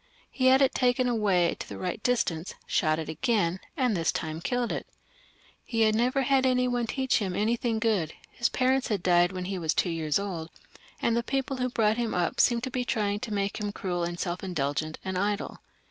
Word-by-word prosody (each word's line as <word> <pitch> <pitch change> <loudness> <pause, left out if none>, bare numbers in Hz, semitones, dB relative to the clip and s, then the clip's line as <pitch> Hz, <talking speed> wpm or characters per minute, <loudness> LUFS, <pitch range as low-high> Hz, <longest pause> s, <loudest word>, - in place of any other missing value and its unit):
He 260 -1 +1
had 265 +1 +6
it 270 - +3
taken 250 0 +2
away 200 -7 +2
to - - -7
the - - -7
right 180 +3 -3
distance, 190 -9 0
shot 155 -3 +1
at 160 - -4
it - - -3
again, 185 - 0 0.2
and 250 -6 +2
this 165 -2 +1
time 160 0 -4
killed 245 +3 -1
it - - -4 0.8
He 230 -2 -1
had 215 -1 +4
never 250 +5 +2
had 270 0 +3
any 250 -1 +3
one 245 -1 0
to - - -4
teach 265 -2 +2
him 190 -4 -2
anything 225 +2 0
good; 215 -8 0 0.2
his 235 - 0
parents 260 +1 +1
had 200 -5 -1
died 175 0 +4
when 185 -1 -4
he 190 0 -3
was 160 -2 0
two 175 - +1
years 155 -3 0
old, 180 -5 -4 0.5
and 230 - +2
the 235 - +2
people 270 +2 -2
who 250 0 0
brought 220 -2 +2
him 235 -2 -1
up 175 -1 0
seemed 235 -1 +3
to 260 - -3
be 250 0 -1
trjdng 210 -4 -1
to 240 - -5
make 200 0 -1
him 205 -1 -2
cruel 180 -3 -3
and 175 0 -3
self 175 0 -3
indulgent 155 -3 -2
and 190 -1 -2
idle. 205 +1 -2
210 Hz, 225 wpm, -28 LUFS, 175-245 Hz, 0.8 s, had